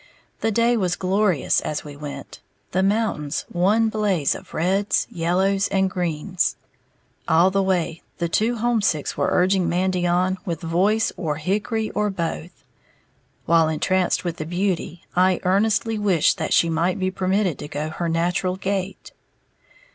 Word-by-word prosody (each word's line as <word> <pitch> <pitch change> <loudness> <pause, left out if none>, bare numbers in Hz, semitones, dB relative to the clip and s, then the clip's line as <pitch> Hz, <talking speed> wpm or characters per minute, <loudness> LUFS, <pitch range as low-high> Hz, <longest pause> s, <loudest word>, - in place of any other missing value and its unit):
The - - 0
day 235 +2 +2
was 180 -4 0
glorious 185 -4 +1
as 150 - -3
we 145 -1 -9
went, 145 0 -8 0.3
the 185 - +1
mountains 195 -8 0
one 205 +6 +2
blaze 200 -9 +1
of - - -11
reds, 190 +5 +1
yellows 190 +4 +1
and 190 -1 +1
greens. 180 0 -1 0.7
All 170 +4 +4
the 195 +1 +2
way, 180 -4 -1 0.2
the 170 - -1
"two 220 +8 +1
homesicks" 220 -10 0
were - - 0
urging 185 0 +2
Mandy 180 0 0
on 185 +2 +1
with 170 -4 -4
voice 195 +7 +1
or 155 -5 -2
hickory 210 +7 -2
or 210 0 0
both; 170 -2 -5 0.8
while, 165 -1 +4
entranced 185 +3 0
with 175 -1 -3
the 155 - -4
beauty, 175 -1 -2
I 185 0 +3
earnestly 210 +3 +1
wished 190 -7 +2
that - - -2
she 170 - +4
might 165 +4 0
be 185 -1 -1
permitted 185 -3 0
to - - -6
go 150 +2 -4
her 170 +1 -3
natural 175 +2 0
gait. 195 0 -4
185 Hz, 150 wpm, -22 LUFS, 170-200 Hz, 0.8 s, All